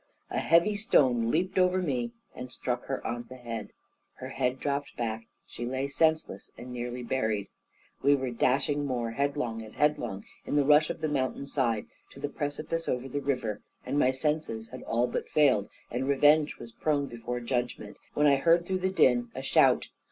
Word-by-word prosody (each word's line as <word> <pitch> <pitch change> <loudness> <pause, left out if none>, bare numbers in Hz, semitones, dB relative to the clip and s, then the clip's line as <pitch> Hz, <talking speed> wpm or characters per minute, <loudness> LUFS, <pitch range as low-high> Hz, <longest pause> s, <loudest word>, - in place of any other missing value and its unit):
A - - 0
heavy 170 +6 +4
stone 130 - +3
leaped 185 +7 +1
over 185 0 +3
me, 125 -9 -1 0.2
and 125 0 -8
struck 125 -1 -3
her 135 - -4
on 120 0 -3
the 130 - -9
head; 115 -3 -6 0.5
her 130 - -7
head 130 -1 -1
dropped 140 0 -2
back, 115 -1 -3 0.2
she - - -8
lay 130 +3 -2
senseless, 160 +2 0
and 125 +1 -8
nearly 125 0 -4
buried. 110 -5 -1 0.5
We 140 +1 +5
were 130 -2 -2
dashing 140 +4 +1
more 120 -4 -2
headlong 140 -3 -1
and 110 -1 -11
headlong, 120 -9 0 0.2
in - - -3
the 145 -1 +4
rush 150 +1 +5
of 165 - -5
the 155 - +1
mountain 140 -1 -1
side, 120 -6 0 0.3
to - - -12
the 145 +1 -3
precipice 155 +3 -3
over 125 +1 -1
the 145 +2 -3
river, 125 -7 -2 0.2
and 145 - 0
my 130 - +4
senses 130 -5 -2
had 130 - -8
all 120 +2 +1
but - - -3
failed, 130 -9 +3 0.2
and 125 +3 -2
revenge 145 +2 +4
was 115 - -10
prone 145 +2 0
before 120 -1 -5
judgment, 120 -3 -3 0.2
when 150 - +3
I 140 -1 +6
heard 170 +4 +4
through 185 +1 -1
the 190 +1 +1
din 125 -10 +3
a - - -5
shout. - - +4
130 Hz, 190 wpm, -29 LUFS, 120-150 Hz, 0.5 s, I